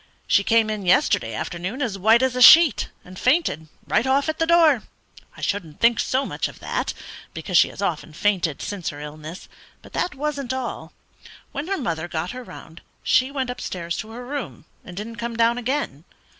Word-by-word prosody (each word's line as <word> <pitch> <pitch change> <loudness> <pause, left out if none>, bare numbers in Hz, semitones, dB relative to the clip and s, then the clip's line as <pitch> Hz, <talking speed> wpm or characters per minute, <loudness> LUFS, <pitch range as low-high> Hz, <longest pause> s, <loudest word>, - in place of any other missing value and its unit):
She 200 - +3
came 225 0 +3
in 210 -2 -4
yesterday 115 -10 +2
afternoon 180 - -4
as 240 -8 -1
white 220 +5 +4
as 260 -1 +1
a 250 - -1
sheet, 315 0 +8 0.2
and 180 0 -11
fainted 255 - +1 0.2
right 245 - +1
off 275 +3 +2
at 315 - -3
the 325 - +1
door. 325 -7 +5 0.6
I - - -11
shouldn't 170 -7 -3
think 235 0 +4
so 265 +1 0
much - - -2
of - - -12
that, - - -3 0.4
because - - -4
she - - +7
has - - -7
often - - -2
fainted 175 -4 0
since 200 -5 -4
her 145 - -8
illness, 155 +3 -9 0.4
but - - -15
that 355 -5 -1
wasn't 280 -2 -3
all. 260 -2 -5 0.6
When 285 +4 -5
her 390 0 -1
mother 170 - -3
got 170 +1 -3
her 255 0 -7
round 170 -7 -12 0.2
she 255 +1 +3
went 265 -3 -2
upstairs 170 -8 -4
to 220 - -6
her 240 +2 -8
room, 245 - -6 0.2
and 175 - -11
didn't 225 +3 -6
come 235 +2 -4
down 230 +1 +3
again. 245 - -2
230 Hz, 195 wpm, -23 LUFS, 175-265 Hz, 0.6 s, sheet